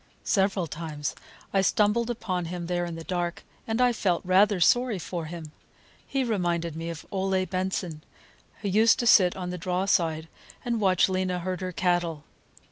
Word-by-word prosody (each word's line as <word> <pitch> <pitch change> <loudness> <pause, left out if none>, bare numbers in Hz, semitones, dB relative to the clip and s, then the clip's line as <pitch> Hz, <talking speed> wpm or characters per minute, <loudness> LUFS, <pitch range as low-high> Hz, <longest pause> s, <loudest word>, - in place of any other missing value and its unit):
Several 195 -3 +1
times 155 -2 -5 0.4
I 195 - +4
stumbled 210 +4 +2
upon 185 -7 -2
him 175 +1 -5
there 175 0 -1
in 170 -1 -5
the 165 - -7
dark, 175 0 -3 0.2
and 225 +1 -1
I 250 -1 +4
felt 185 -6 0
rather 195 +2 +4
sorry 245 +5 +3
for 170 0 -5
him. 160 -1 -8 0.6
He 270 -1 0
reminded 175 -8 -1
me 165 +1 -4
of 165 -2 -7
Ole 190 -1 0
Benson, 185 -3 -3 0.6
who - - -1
used 220 +4 +5
to 245 - -1
sit 185 -6 +6
on 180 -1 -4
the 180 - -5
draw 180 +2 -1
side 165 -5 +1 0.4
and 235 -2 -1
watch 185 -3 +4
Lena 185 -1 -1
herd 185 +1 -3
her 185 0 -3
cattle. 175 -3 0
185 Hz, 175 wpm, -27 LUFS, 170-200 Hz, 0.6 s, sit